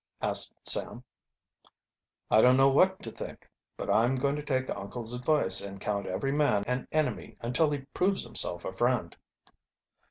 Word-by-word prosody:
asked -, -, +1 dB
Sam. -, -, +2 dB, 1.3 s
"I 110 Hz, -, +6 dB
don't 125 Hz, +2 st, +5 dB
know 135 Hz, 0 st, +5 dB
what 190 Hz, +7 st, +2 dB
to 115 Hz, -, -4 dB
think. -, -, -9 dB, 0.3 s
But -, -, -3 dB
I'm 120 Hz, +4 st, +2 dB
going 140 Hz, +2 st, -1 dB
to 150 Hz, -, -4 dB
take 130 Hz, -3 st, -2 dB
uncle's 110 Hz, +4 st, -5 dB
advice 125 Hz, -3 st, +4 dB
and 100 Hz, -1 st, -7 dB
count 100 Hz, 0 st, -3 dB
every 95 Hz, +9 st, -2 dB
man 145 Hz, -8 st, +1 dB
an 125 Hz, +1 st, -3 dB
enemy 155 Hz, -1 st, -2 dB
until 125 Hz, +7 st, +1 dB
he 145 Hz, -2 st, -3 dB
proves 190 Hz, +2 st, 0 dB
himself 85 Hz, 0 st, -1 dB
a -, -, -4 dB
friend." 115 Hz, -3 st, -1 dB
125 Hz, 160 wpm, -28 LUFS, 105-145 Hz, 1.3 s, I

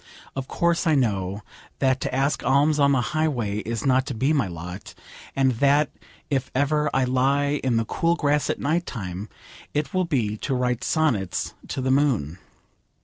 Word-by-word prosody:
Of 135 Hz, -1 st, -4 dB
course 170 Hz, 0 st, +1 dB
I 160 Hz, -, +4 dB
know 100 Hz, -6 st, 0 dB, 0.3 s
that 130 Hz, -1 st, +1 dB
to -, -, -2 dB
ask 135 Hz, +1 st, 0 dB
alms 145 Hz, +3 st, +3 dB
on 140 Hz, 0 st, +5 dB
the 130 Hz, -, +3 dB
highway 130 Hz, -10 st, 0 dB
is 115 Hz, +4 st, -4 dB
not 130 Hz, 0 st, +3 dB
to 135 Hz, -, -3 dB
be 135 Hz, +7 st, +2 dB
my 135 Hz, -9 st, +1 dB
lot, 90 Hz, +3 st, -8 dB, 0.4 s
and 135 Hz, -1 st, +3 dB
that 145 Hz, +1 st, +3 dB, 0.4 s
if 135 Hz, -2 st, -1 dB
ever 150 Hz, +2 st, +2 dB
I 135 Hz, -, +2 dB
lie 140 Hz, +3 st, +1 dB
in 125 Hz, -3 st, +2 dB
the 115 Hz, -, +1 dB
cool 170 Hz, +8 st, +1 dB
grass 145 Hz, -3 st, +1 dB
at -, -, 0 dB
night 165 Hz, +4 st, 0 dB
time 95 Hz, -2 st, -5 dB, 0.5 s
it 150 Hz, -2 st, -1 dB
will 185 Hz, -1 st, +1 dB
be 115 Hz, -10 st, 0 dB
to 135 Hz, +4 st, -2 dB
write 125 Hz, -1 st, 0 dB
sonnets 120 Hz, -, 0 dB
to 135 Hz, -, -3 dB
the 130 Hz, 0 st, +1 dB
moon. 120 Hz, -, +1 dB
135 Hz, 180 wpm, -24 LUFS, 115-145 Hz, 0.5 s, on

